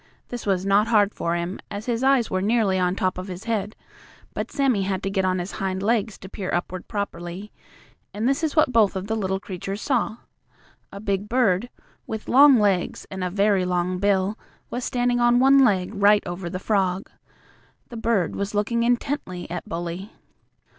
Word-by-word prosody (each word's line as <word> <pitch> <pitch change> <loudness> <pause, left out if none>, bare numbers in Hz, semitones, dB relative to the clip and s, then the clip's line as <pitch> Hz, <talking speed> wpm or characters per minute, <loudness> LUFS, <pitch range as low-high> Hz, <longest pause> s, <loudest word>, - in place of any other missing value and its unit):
This 240 -3 -6
was 190 -1 +1
not 200 +2 +3
hard 210 -3 +3
for 170 0 -1
him, 175 +2 -3
as 205 +1 -6
his 240 0 -1
eyes 265 -3 +3
were 185 -1 0
nearly 205 -2 +2
on 180 0 +1
top 185 -3 -1
of 185 - -6
his 185 0 -7
head, 215 -2 -2 0.6
but - - -4
Sammie 265 -7 +1
had 190 -1 -2
to 195 - -2
get 190 -1 0
on 185 0 +1
his 180 +2 -4
hind 190 0 -3
legs 220 -1 0
to 190 - -11
peer 190 -1 -5
upward 175 +1 -3
properly. 200 -1 -5 0.6
And 215 +3 -2
this 275 +5 +1
is 310 -2 -1
what 305 -5 +3
both 215 -4 +4
of 190 0 -3
the 220 +2 -2
little 190 -3 -1
creatures 195 +1 -6
saw: 240 -3 0 0.7
A 200 - -8
big 200 0 -2
bird, 235 -3 +2 0.4
with 220 -1 -5
long 275 +1 +7
legs 195 -4 0
and 190 -1 -4
a 180 - -1
very 200 0 +2
long 180 0 -1
bill, 200 +1 +1 0.3
was 245 - -3
standing 245 0 0
on 240 0 +4
one 270 +1 +6
leg 190 -5 +2
right 205 0 +4
over 175 0 -5
the 185 - -4
frog. 190 -1 0 0.8
The 235 - -8
bird 225 -6 0
was 200 +1 -3
looking 225 +3 +1
intently 240 -6 -1
at 175 -1 -5
Bully. 175 +4 -5
200 Hz, 190 wpm, -24 LUFS, 185-230 Hz, 0.8 s, long